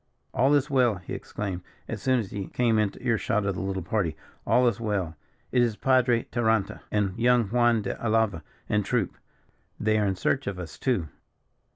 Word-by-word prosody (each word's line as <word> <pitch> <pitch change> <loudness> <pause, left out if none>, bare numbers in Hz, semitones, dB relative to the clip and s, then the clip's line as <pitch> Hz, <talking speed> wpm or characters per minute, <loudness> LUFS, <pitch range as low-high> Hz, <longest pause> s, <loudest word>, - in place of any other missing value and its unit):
"All 135 +5 +4
is 145 -1 +2
well," 125 -6 +3
he 90 -1 -8
exclaimed, 95 -4 -4 0.3
as - - -5
soon 130 -1 +3
as 105 -5 -5
he 100 -2 -4
came 115 -3 +2
into 105 -2 -1
ear 115 -3 +2
shot 105 -1 0
of 100 - 0
the - - -4
little 95 -1 -2
party; 95 -5 -1 0.3
"all 125 0 +4
is 115 -3 0
well. 100 -8 -2 0.4
It 125 - +3
is 115 -3 +2
Padre 125 0 +3
Taranta 110 -4 0
and 100 -3 0
young 120 0 +4
Juan 120 -1 +3
de 95 - -2
Alava, 110 -6 +2 0.3
and 105 0 +1
troop. 110 -1 -1 0.6
They 110 0 +2
are 105 - +2
in 95 - 0
search 135 +8 0
of 100 -2 -3
us, 85 -4 -8
too." 115 - 0
110 Hz, 195 wpm, -27 LUFS, 95-120 Hz, 0.6 s, All